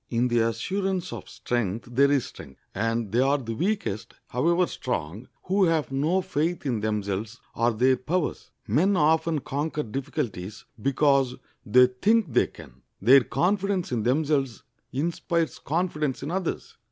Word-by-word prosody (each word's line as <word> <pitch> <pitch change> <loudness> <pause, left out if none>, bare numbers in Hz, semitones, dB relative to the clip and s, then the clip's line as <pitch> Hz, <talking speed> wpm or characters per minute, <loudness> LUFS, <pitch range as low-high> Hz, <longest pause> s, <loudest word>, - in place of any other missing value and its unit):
In 120 +1 +1
the 120 0 +2
assurance 185 - -1
of - - -8
strength 115 -3 -2
there 140 +3 +4
is 140 -4 +2
strength, 65 -1 -12
and 115 0 -1
they 120 - +2
are 135 +2 +3
the 115 -5 -5
weakest, 175 - -2
however 170 +8 +2
strong, 110 - -4 0.2
who 190 +1 +2
have 160 -5 +1
no 160 +8 +1
faith 160 0 -1
in 120 -5 0
themselves 105 +1 -2
or 115 +1 +2
their 130 +4 +3
powers. 170 +5 -2 0.2
Men 175 - +3
often 160 0 +2
conquer 150 +3 -2
difficulties 110 - -4 0.2
because 135 -1 +2 0.3
they 125 +4 +6
think 180 - +1
they - - +4
can. 70 -5 -15 0.2
Their 130 +5 +6
confidence 195 +1 0
in 120 -3 0
themselves 135 0 0 0.3
inspires 165 +3 -1
confidence 150 -4 -1
in 145 - -4
others. 185 -1 -3
135 Hz, 145 wpm, -26 LUFS, 115-165 Hz, 0.3 s, they